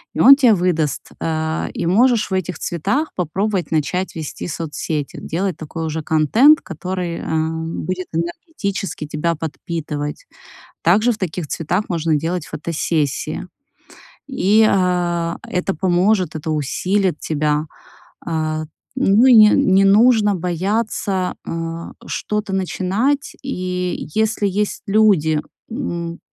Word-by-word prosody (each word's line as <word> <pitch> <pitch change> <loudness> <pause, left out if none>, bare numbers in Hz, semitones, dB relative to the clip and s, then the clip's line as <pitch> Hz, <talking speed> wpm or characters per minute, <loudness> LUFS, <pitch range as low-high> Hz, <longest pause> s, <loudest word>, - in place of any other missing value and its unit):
и - - -3
он 275 - +9
тебе 250 -6 +5
выдаст, 170 -5 -1
э. 160 0 -1
И - - -3
можешь 225 +3 +3
в - - -1
этих 185 -2 -2
цветах 265 - -1
попробовать 190 +2 -1
начать 160 +4 -1
вести 160 -3 -5
соцсети, 155 -2 -4
делать 185 +2 -2
такой 160 +1 -5
уже 160 0 -3
контент, 220 - +5
который, 180 -1 -4
э, - - -7 0.6
будет 185 0 -3
энергетически 190 - -3
тебя 155 +3 -1
подпитывать. 150 -2 -5 0.6
Также 215 +8 +4
в 215 - -7
таких 175 -4 -4
цветах 175 +8 -2
можно 165 -2 0
делать 165 +2 -2
фотосессии. 155 0 -2 0.8
И, 215 -5 +3
э, 175 -2 +1
это 180 +1 -1
поможет, 180 0 +1
это 155 +1 -4
усилит 180 +4 0
тебя. 150 0 0 0.6
Э, 155 -1 -1 0.3
ну 235 -2 +4
и 260 - +7
не 215 -2 +8
ну - - +4
и - - +1
не 195 +1 +5
нужно 210 +1 +5
бояться, 190 +2 -1
э, 165 0 -5
что-то 210 -2 -3
начинать. 195 - -1
И 180 -8 -3
если 220 -1 +1
есть 205 +2 -2
люди, 195 -8 +3 0.3
м, 170 -9 -4
180 Hz, 125 wpm, -19 LUFS, 160-205 Hz, 0.8 s, он